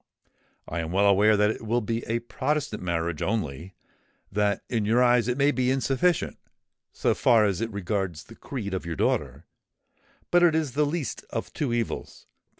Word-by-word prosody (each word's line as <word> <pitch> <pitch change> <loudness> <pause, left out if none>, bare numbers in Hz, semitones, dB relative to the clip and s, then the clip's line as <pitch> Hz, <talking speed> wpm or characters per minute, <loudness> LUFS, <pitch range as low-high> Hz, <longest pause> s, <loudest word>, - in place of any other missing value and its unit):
I 85 - -3
am 80 0 -3
well 100 +3 +3
aware 105 +2 +5
that 105 +1 +3
it - - -7
will 115 +2 +1
be 115 +1 -3
a 115 +1 -1
Protestant 135 -1 -2
marriage 85 -3 -2
only;—that 95 +3 -3
in 115 -3 -1
your 115 +4 +3
eyes 120 -2 +4
it 125 +1 0
may 140 +1 +4
be 130 -2 0
insufficient, 135 +6 +1 0.5
so - - +1
far 115 -3 +4
as 100 -2 0
it 115 0 -2
regards 95 -4 -3
the - - -14
creed 110 -8 -5
of 95 - -2
your 85 -1 -4
daughter;—but 175 - -3
it 170 -2 +5
is 155 -4 0
the 150 +3 +1
least 150 -5 -3
of - - -5
two 140 -5 -2
evils. 120 -1 -3
110 Hz, 170 wpm, -26 LUFS, 95-130 Hz, 0.5 s, aware